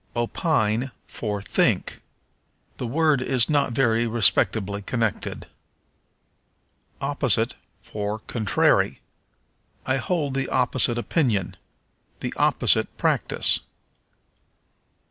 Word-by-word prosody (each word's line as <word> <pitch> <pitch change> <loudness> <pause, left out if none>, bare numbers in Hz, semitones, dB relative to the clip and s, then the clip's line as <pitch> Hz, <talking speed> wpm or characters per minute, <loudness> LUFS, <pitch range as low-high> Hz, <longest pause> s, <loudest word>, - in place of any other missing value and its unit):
Opine 120 - 0
for 105 -3 -4
Think. - - 0 0.8
The 125 - -4
word 150 +1 +2
is 130 +2 +1
not 140 -4 +1
very 115 -2 +2
respectably 105 -3 +2
connected. 110 +1 -2 1.5
Opposite - - +1 0.3
for 105 0 -4
Contrary. 110 -1 +1 0.9
"I 130 +1 +1
hold 145 0 -1
the 135 -1 -2
opposite 125 -1 +1
opinion." 120 - 0 0.7
"The - - -3
opposite - - +1
practice." - - +1
120 Hz, 85 wpm, -24 LUFS, 110-135 Hz, 1.5 s, word